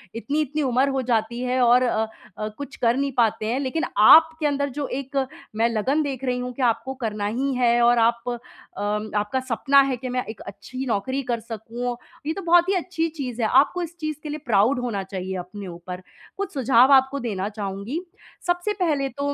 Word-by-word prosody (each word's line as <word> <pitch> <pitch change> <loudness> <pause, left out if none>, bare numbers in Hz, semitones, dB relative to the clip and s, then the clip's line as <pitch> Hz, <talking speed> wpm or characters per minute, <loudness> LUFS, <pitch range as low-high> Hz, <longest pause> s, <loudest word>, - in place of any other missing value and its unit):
इतनी-इतनी 295 +4 -1
उम्र 260 +1 +2
हो 270 -1 0
जाती 230 +2 -1
है 255 0 0
और 245 +1 +5
अ 220 -3 +1 0.3
अ, 215 - -3
कुछ 285 0 -7
कर 235 -1 +2
नहीं 280 0 0
पाते 225 -2 +2
हैं, 235 +4 0
लेकिन 280 +4 -2
आपके 320 +8 +7
अंदर 285 0 0
जो 290 -1 -2
एक 275 +1 -5 0.4
मैं 225 +2 +3
लगन 250 +7 +1
देख 270 -3 -4
रही 250 -1 0
हूँ 250 0 -4
कि 265 - -6
आपको 230 +2 +1
करना 210 -2 -2
ही 260 +6 -1
है 240 -1 +3
और 240 0 +5
आप 235 +1 +3
अ, 240 -1 -1 0.8
आपका 210 +6 -1
सपना 260 +2 +3
है 270 -2 0
कि, 255 +1 -6
"मैं 250 0 -1
एक 220 - -8
अच्छी 255 +6 -7
नौकरी 260 +4 -1
कर 235 - 0
सकूँ।" 230 +2 -5 0.3
ये 315 - 0
तो 390 - -6
बहुत 350 0 +4
ही - - +3
अच्छी 350 -2 -1
चीज़ 260 -7 -5
है। 220 - +2
आपको 275 +9 +3
इस 340 0 -7
चीज़ 310 -1 -3
के 305 - -5
लिए 295 - -3
प्राउड 230 +3 +3
होना 230 -6 -2
चाहिए 190 -1 -5
अपने 195 +2 -9
ऊपर। 180 +1 -8 0.4
कुछ 400 0 -4
सुझाव 260 -1 +4
आपको 265 +1 +4
देना 205 -5 -3
चाहूँगी। 205 - -4 0.5
सबसे 355 +4 0
पहले 290 -6 +1
तो 285 0 0
250 Hz, 205 wpm, -24 LUFS, 225-280 Hz, 0.8 s, आपके